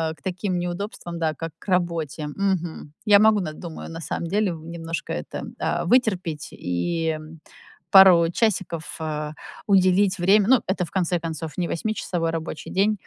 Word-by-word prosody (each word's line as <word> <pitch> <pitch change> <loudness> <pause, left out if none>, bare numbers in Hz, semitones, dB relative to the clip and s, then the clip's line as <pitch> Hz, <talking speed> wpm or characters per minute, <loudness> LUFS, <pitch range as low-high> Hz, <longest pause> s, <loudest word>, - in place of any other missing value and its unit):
к 145 - -28
таким 185 0 -2
неудобствам, 175 -1 -5
да, 160 -2 0
как 165 +2 -6
к - - -18
работе, 165 -4 -1
мгм. 175 -3 -2
Я 205 -1 +7
могу 215 0 +5
на 155 -5 -3
думаю, 165 0 -8
на 165 0 -7
самом 170 - -3
деле, 205 0 +1
немножко 165 0 -5
это, - - -5 0.2
э, - - -1
вытерпеть 185 - +1
и 160 - -2 0.7
пару 180 -4 +8
часиков, 185 -6 -1
э, 150 -1 -3 0.4
уделить 190 0 +4
время, 195 +4 +5
ну, 260 - +6
это, 185 -2 0
в - - -15
конце 180 -2 0
концов, 160 -1 -5
не 175 -2 0
восьмичасовой 175 -4 -2
рабочий 160 -1 -5
день, 205 +3 +3
175 Hz, 155 wpm, -24 LUFS, 165-195 Hz, 0.7 s, пару